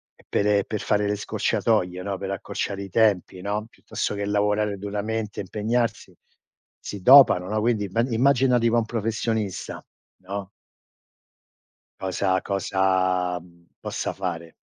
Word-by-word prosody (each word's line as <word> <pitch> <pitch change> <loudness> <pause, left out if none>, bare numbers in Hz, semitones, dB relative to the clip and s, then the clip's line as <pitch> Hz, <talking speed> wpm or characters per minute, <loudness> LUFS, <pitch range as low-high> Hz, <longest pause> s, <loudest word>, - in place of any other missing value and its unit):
e - - -24
pere 100 -1 +2
per 110 - -3
fare 105 0 +1
le 105 - 0
scorciatoie, 90 -3 0
no, 100 -1 -3
per 95 - -4
accorciare 100 +1 -4
i 95 - -8
tempi, 95 -3 +1
no? 105 +2 -2
Piuttosto - - -4
che 100 0 -3
lavorare 105 0 +1
duramente, 105 +2 -3
impegnarsi, 110 +4 -2 0.6
si 100 - -7
dopano, 125 -6 +7
no? 110 - 0
Quindi 110 -2 +1
imma 105 +5 0
immagina 125 +1 +3
tipo 115 0 +2
un 115 - +1
professionista, 110 -2 -3 0.4
no? 100 +1 -5 1.5
Cosa 95 0 0
cosa, 95 -2 0
mhmm, 85 0 -20
possa - - -3
fare? 85 -3 -5
100 Hz, 130 wpm, -24 LUFS, 95-110 Hz, 1.5 s, dopano